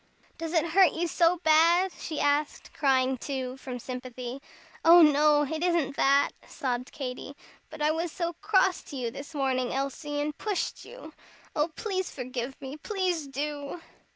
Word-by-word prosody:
"Does 330 0 -4
it 325 -2 +3
hurt 365 -1 +5
you 345 +1 -1
so 340 +2 +3
bad?" 335 +4 +5
she 315 - -6
asked, 290 +1 0
crying, 260 -2 +2
too, 260 -2 -4
from 260 -2 -6
sympathy. 250 +1 -7 0.4
"Oh, 340 +1 +9
no! 295 0 +5
it 315 +3 -3
isn't 335 -6 +1
that," 275 +1 +3 0.2
sobbed 250 -1 -3
Katy, 270 0 -6 0.3
"but 300 - -6
I 305 - +4
was 330 +1 -2
so 340 0 -3
cross 385 -3 +3
to 290 - -9
you 245 -3 -3
this 280 +4 -9
morning, 260 -3 0
Elsie, 275 +2 -3
and 295 +1 -2
pushed 410 -1 -3
you. 405 -11 -11 0.4
Oh, 300 +1 +2
please 380 -4 -2
forgive 255 0 -5
me, 275 +1 -7
please 360 -4 -2
do!" 285 +3 -4
295 Hz, 160 wpm, -28 LUFS, 265-335 Hz, 0.4 s, Oh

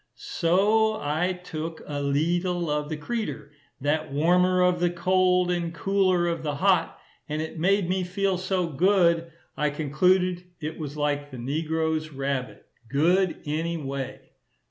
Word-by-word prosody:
So 205 +6 +2
I 155 +5 0
took 160 -1 -6
"a 145 -1 -4
leetle 170 +4 0
of 150 0 -1
the 155 - -3
creater," 150 -4 -4 0.3
that 150 +2 -1
warmer 180 +5 +3
of 180 -1 +2
the 175 0 +2
cold, 180 +1 +2
and 170 -1 -1
cooler 185 0 +1
of 170 -2 -1
the 150 -2 -2
hot, 180 0 +2 0.3
and 150 +1 -2
it 160 +1 -5
made 195 +2 +2
me 185 +1 0
feel 185 +1 -1
so 185 -1 0
good 170 +2 +3
that 165 0 -10 0.2
I 150 0 +1
concluded 180 +5 +1 0.2
it 155 +1 -5
was 150 -1 -6
like 145 -1 -1
the 130 - -9
negro's 155 +4 -1
rabbit, 135 -2 -3 0.2
"good 175 +6 +2
any 165 +3 -2
way." 135 -3 -5
165 Hz, 150 wpm, -26 LUFS, 150-180 Hz, 0.3 s, warmer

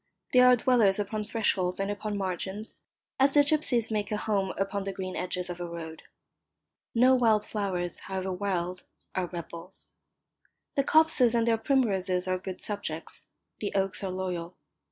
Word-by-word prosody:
They 250 - +7
are 250 0 +8
dwellers 230 -5 +3
upon 210 +1 -2
thresholds 195 -5 0
and 195 +1 0
upon 205 0 -3
margins, 190 +2 -4 0.4
as 275 +1 +4
the 290 - +7
gipsies 285 -7 +2
make 210 -1 -1
a 210 - 0
home 200 -3 0
upon 195 +1 -1
the 195 - -3
green 185 -1 -5
edges 180 0 -2
of 175 0 -6
a 175 - -4
road. 165 -1 -7 0.9
No 250 +3 +6
wild 225 -4 +3
flowers, 185 -5 -2
however 190 0 -4
wild, 180 -1 -2 0.3
are 185 -1 -1
rebels. 170 +1 -9 0.8
The 275 - +2
copses 290 -6 +4
and 230 -1 +3
their 225 -1 +2
primroses 195 -8 +1
are 185 0 0
good 185 0 -6
subjects, 200 -6 -4 0.3
the 205 - -3
oaks 195 0 0
are 190 - -1
loyal. 180 -2 -4
195 Hz, 160 wpm, -28 LUFS, 185-225 Hz, 0.9 s, are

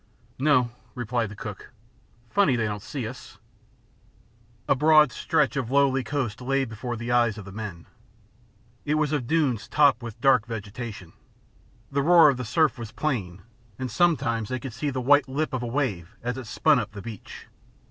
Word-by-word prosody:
"No," 130 -4 +3 0.2
replied 120 -2 -2
the 105 - -10
cook. 105 -1 -8 0.6
"Funny 200 -11 +3
they 115 -2 0
don't 105 -1 -3
see 125 +1 -5
us!" 125 +2 -10 1.3
A - - +5
broad 150 0 +5
stretch - - 0
of 130 -4 -2
lowly 135 -1 +3
coast 130 -6 -3
lay 135 +2 0
before 115 +1 -5
the 120 +1 -4
eyes 120 -3 +2
of 105 - -8
the 100 - -9
men. 100 -5 -7 1.0
It 150 0 0
was 155 -1 +1
of 140 -6 -1
dunes 140 -8 +1
topped 140 -5 +4
with 115 -3 -8
dark 130 -5 +4
vegetation. 105 -4 -7 0.8
The 140 +1 +1
roar 165 0 +7
of 135 - 0
the 125 - -4
surf 155 +2 +1
was 115 -2 -7
plain, 100 -12 -3 0.3
and 130 -1 -4
sometimes 115 - +1
they 130 - -2
could 130 -2 -7
see 145 +5 -2
the 130 -2 -3
white 145 +3 +4
lip 145 +3 -2
of 130 - -1
a 120 - -3
wave 115 - -2
as 125 0 -2
it 130 -3 -7
spun - - +3
up 105 - -5
the 100 -2 -8
beach. 110 -4 -9
125 Hz, 180 wpm, -25 LUFS, 110-140 Hz, 1.3 s, roar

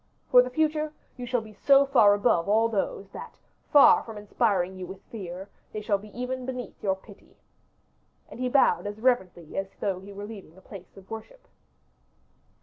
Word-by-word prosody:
For 250 - +9
the 250 - -2
future, 305 +2 0 0.2
you 245 -1 -7
shall 245 -1 0
be 215 -1 -12
so 275 +5 +5
far 225 -7 +5
above 200 -4 +1
all 220 +2 +4
those, 200 -2 -2
that, - - -9 0.4
far 290 - +7
from 225 -2 -9
inspiring 200 -3 0
you 185 -1 -7
with 190 +1 -10
fear, 190 -3 -7 0.3
they 215 - -3
shall 205 -2 0
be 210 +1 -13
even 255 +1 -3
beneath 250 -4 -6
your 190 -2 +1
pity." 195 +1 -18 0.9
And - - -12
he 255 0 -1
bowed 270 -5 +3
as 205 +1 -6
reverently 190 -10 0
as 195 - -3
though 190 -2 -1
he 195 +2 -12
were 200 +1 -7
leaving 195 -6 -11
a - - -13
place 190 -1 -13
of 195 +2 -15
worship. 225 - -9
215 Hz, 185 wpm, -27 LUFS, 195-250 Hz, 0.9 s, For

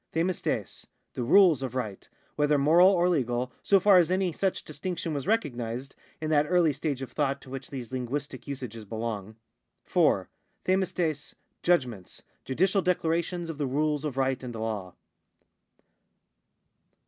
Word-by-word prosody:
Q(fii(Tres, 170 +2 -2 0.3
the - - -4
rules 160 +2 +5
of 130 -2 -4
right, 110 -7 -4 0.3
whether 150 0 +3
moral 165 +6 +6
or 180 -2 +3
legal, 125 -6 0
so 195 - +4
far 195 0 +6
as 175 -2 +4
any 185 -1 +1
such 190 +4 -1
distinction 165 +1 -4
was 140 -2 -4
recognised 130 - -2 0.2
in 155 0 -3
that 150 -1 +3
early 175 -4 +4
stage 140 -1 -3
of 125 - -8
thought 140 -1 0
to 130 - -13
which 135 0 -6
these 130 -4 -7
linguistic 130 +4 -4
usages 125 -5 -6
belong. 110 -1 -5 0.5
4. - - +2 0.4
QeidKTTfQ, 180 -5 0 0.3
judgments, 125 - 0 0.2
judicial 190 +9 +1
declarations 170 -1 0
of 160 -2 -6
the 145 - 0
rules 150 +2 0
of 145 -4 -4
right 135 -1 +1
and 125 -2 -6
law. 110 -5 -4
145 Hz, 145 wpm, -28 LUFS, 125-175 Hz, 0.5 s, moral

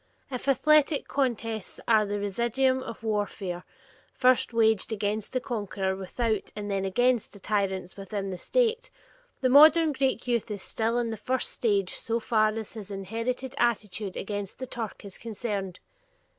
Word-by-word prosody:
If 255 +1 -5
athletic 295 +2 +4
contests 230 -6 -2
are 215 -2 +4
the 205 0 -2
residuum 240 +6 +1
of 230 -3 -8
warfare 205 -4 -2 0.5
first 255 -1 +3
waged 220 -2 +3
against 210 0 -2
the 255 - 0
conqueror 205 -6 -2
without 215 +3 -2
and 205 -1 -4
then 195 -1 0
against 245 +4 +1
the 200 - -12
tyrants 195 -3 -1
within 195 0 -4
the 185 - -4
State, - - +1 0.5
the 255 - +3
modern 310 +4 +7
Greek 265 -3 0
youth 235 -3 0
is 205 -2 -4
still 230 +1 0
in 235 -1 0
the 220 - -4
first 255 +4 -1
stage 200 -5 +1
so 230 +1 -1
far 215 -1 +3
as 220 -1 -5
his 210 -3 -8
inherited 230 +6 -3
attitude 210 -4 0
against 205 -1 -4
the 260 - -5
Turk 230 -5 -6
is 195 - -9
concerned. 205 -4 -4
220 Hz, 160 wpm, -28 LUFS, 200-250 Hz, 0.5 s, modern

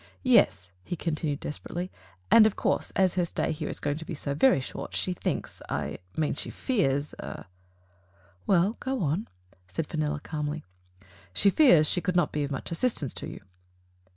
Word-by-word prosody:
"Yes," 95 - +4
he 175 - -4
continued 155 -3 -2
desperately, 175 +4 -4 0.4
"and, 215 -1 +9
of 215 - -2
course, - - 0
as 190 -2 +4
her 180 - +1
stay - - -1
here 155 -1 -3
is - - -4
going 145 0 -1
to 165 - -6
be 165 +1 -5
so 140 -1 -2
very 160 - +5
short, 130 - -6
she 185 - 0
thinks - - -3
— - - -22
I - - -2 0.2
mean 155 -2 +1
she - - -3
fears 150 - 0 0.7
" 90 0 -33
"Well, 195 +4 +3
go 265 -5 -2
on," 160 +8 0 0.4
said 145 - -3
Fenella 150 -1 -2
calmly. 150 0 -4 0.7
*'She 200 - +4
fears 185 - +6
that - - +1
she 180 - +1
could 185 -1 -1
not 175 - +3
be 150 - -1
of 140 - -2
much 135 +2 -4
assistance 170 - 0
to - - -6
you." - - -8
155 Hz, 185 wpm, -28 LUFS, 145-185 Hz, 0.7 s, and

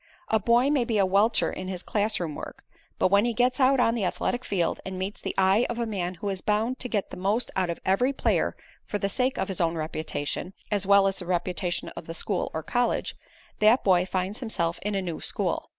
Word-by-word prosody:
A 220 - +3
boy 240 +6 +3
may 280 -4 +3
be 230 -2 -1
a 195 - +4
welcher 205 +4 +2
in 185 - -5
his 185 -1 -4
classroom 205 -7 0
work, - - -8 0.3
but - - +3
when 200 +2 +5
he 235 -1 0
gets 250 +3 +2
out 265 0 +4
on 230 -2 +4
the 230 -4 -1
athletic 245 +6 -1
field 175 -4 0
and 190 -1 -5
meets 190 +2 -4
the - - -4
eye 195 +5 +4
of 240 - -3
a 235 - 0
man 185 -5 -3
who 200 +4 -4
is 190 -2 -3
bound 220 +5 0
to 250 - -3
get 205 -4 -1
the - - -7
most 200 +6 0
out 185 -2 +1
of 170 - -3
every 195 +8 +3
player 275 - 0 0.3
for 205 - -2
the 200 -1 -1
sake 255 +6 0
of 190 - -1
his 190 -2 -2
own 165 0 +1
reputation, 155 +2 -3 0.2
as 200 -2 +1
well 200 0 +6
as 195 0 +1
the 180 - -5
reputation 180 0 -1
of - - -9
the 165 - -4
school 185 +2 -1
or 160 - -4
college, 245 +7 0 0.4
that 215 +4 +5
boy 180 -2 +4
finds 190 +3 -2
himself 170 -9 -2
in 210 0 -2
a 195 - 0
new 170 -3 -4
school. - - -2
200 Hz, 235 wpm, -26 LUFS, 180-230 Hz, 0.4 s, well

